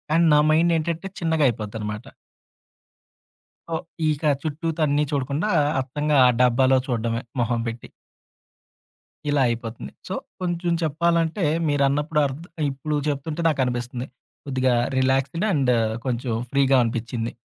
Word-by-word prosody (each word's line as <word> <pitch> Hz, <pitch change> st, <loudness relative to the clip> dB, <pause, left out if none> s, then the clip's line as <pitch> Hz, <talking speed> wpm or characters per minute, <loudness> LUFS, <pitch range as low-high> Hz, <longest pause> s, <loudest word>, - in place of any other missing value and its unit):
And 170 Hz, 0 st, +4 dB
నా -, -, +6 dB
mind 165 Hz, +2 st, +3 dB
ఏంటంటే 165 Hz, +3 st, -3 dB
చిన్నగా 160 Hz, -3 st, +1 dB
అయిపోద్ది 110 Hz, -1 st, -5 dB
అన్నమాట. 105 Hz, +2 st, -5 dB, 1.7 s
ఒ -, -, +1 dB, 0.3 s
ఇక 150 Hz, 0 st, -2 dB, 0.2 s
చుట్టూతా 160 Hz, +1 st, -3 dB
అన్ని 145 Hz, +1 st, +2 dB
చూడకుండా, 140 Hz, +7 st, -1 dB, 0.3 s
అత్తంగ 145 Hz, +3 st, -3 dB
ఆ -, -, +7 dB
డబ్బాలో 130 Hz, +2 st, +4 dB
చూడడమే 115 Hz, -2 st, -1 dB, 0.2 s
మొహం 120 Hz, 0 st, 0 dB
పెట్టి. 115 Hz, 0 st, -6 dB, 1.4 s
ఇలా 145 Hz, -1 st, +2 dB
అయిపోతుంది. 115 Hz, -, -5 dB, 0.2 s
సో, -, -, -4 dB, 0.3 s
కొంచెం 175 Hz, -1 st, -1 dB
చెప్పాలంటే 170 Hz, +3 st, +1 dB, 0.3 s
మీరన్నప్పుడు 145 Hz, +2 st, +1 dB
అర్డ్ 140 Hz, +4 st, -5 dB, 0.3 s
ఇప్పుడు 145 Hz, +3 st, -3 dB
చెప్తుంటే 150 Hz, +3 st, -3 dB
నాకనిపిస్తుంది. 125 Hz, -3 st, -2 dB, 0.4 s
కొద్దిగా 130 Hz, -2 st, +1 dB, 0.2 s
రిలాక్సేడ్ 135 Hz, +7 st, +1 dB
అండ్, 135 Hz, -5 st, +2 dB, 0.3 s
కొంచెం 125 Hz, -1 st, -2 dB, 0.2 s
ఫ్రీ‌‌గా 135 Hz, -1 st, +4 dB
అనిపించింది 115 Hz, 0 st, -3 dB
140 Hz, 115 wpm, -23 LUFS, 120-155 Hz, 1.7 s, ఆ